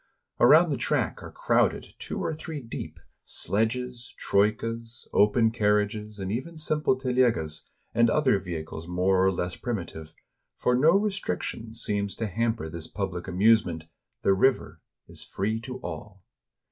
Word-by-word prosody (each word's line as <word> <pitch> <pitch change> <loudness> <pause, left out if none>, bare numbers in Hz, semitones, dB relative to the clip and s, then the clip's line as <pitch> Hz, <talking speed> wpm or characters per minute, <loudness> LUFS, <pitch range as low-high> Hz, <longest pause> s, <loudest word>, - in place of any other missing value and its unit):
Around - - +7
the - - 0
track - - 0
are - - -9
crowded, - - +1
two - - -5
or - - -1
three 155 0 -6
deep, 115 -4 -7 0.2
sledges, 120 +3 -2
troikas, 115 +3 0
open 110 +2 +4
carriages, 105 -1 0
and 95 -1 -4
even 145 +9 -4
simple 155 -3 +1
telegas, 125 - 0 0.3
and 115 0 +4
other 130 -7 +3
vehicles 80 -2 -6
more 90 +1 +2
or 95 - +4
less 90 0 -3
primitive; 85 -9 -5 0.5
for 125 - +1
no 160 +9 +5
restriction 195 - -3
seems 100 -3 -2
to 115 - -2
hamper 110 -3 -1
this 80 0 -7
public 95 -3 -4
amusement: 95 -3 +3 0.4
the 100 - +4
river 130 +8 +1 0.3
is - - -9
free 110 +4 -2
to 125 +2 -7
all. 95 +3 -8
110 Hz, 140 wpm, -27 LUFS, 95-125 Hz, 0.5 s, Around